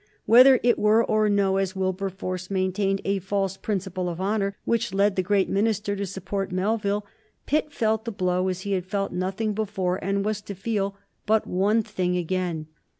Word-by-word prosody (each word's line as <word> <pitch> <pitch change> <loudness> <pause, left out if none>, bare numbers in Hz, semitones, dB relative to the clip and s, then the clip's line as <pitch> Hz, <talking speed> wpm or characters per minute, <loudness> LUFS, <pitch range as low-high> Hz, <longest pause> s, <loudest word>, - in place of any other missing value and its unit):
Whether 255 +3 +8
it 240 0 +3
were 215 +2 +4
or 215 0 +2
no, 200 -1 +2
as 195 0 -1
Wilberforce 185 -1 -3
maintained, 195 +1 0
a 195 0 +1
"false 195 0 -1
principle 190 -3 -3
of 170 0 -5
honor" 200 0 -1
which 230 -4 0
led 200 0 +3
the 185 - +2
great 195 +1 +2
minister 205 0 0
to 200 0 -3
support 195 +1 -4
Melville, 205 +2 0 0.4
Pitt 300 +1 0
felt 220 -4 0
the 230 - -3
blow 185 -2 0
as 185 0 -2
he 200 - -4
had 185 -2 -1
felt 195 0 -2
nothing 190 +4 -2
before 195 -3 -2
and 195 +1 0
was 210 -1 -1
to 205 -1 -7
feel 200 0 -2 0.3
but 220 0 +3
one 205 +5 +2
thing 180 -2 -1
again. 175 -2 -2
195 Hz, 180 wpm, -25 LUFS, 185-210 Hz, 0.4 s, Whether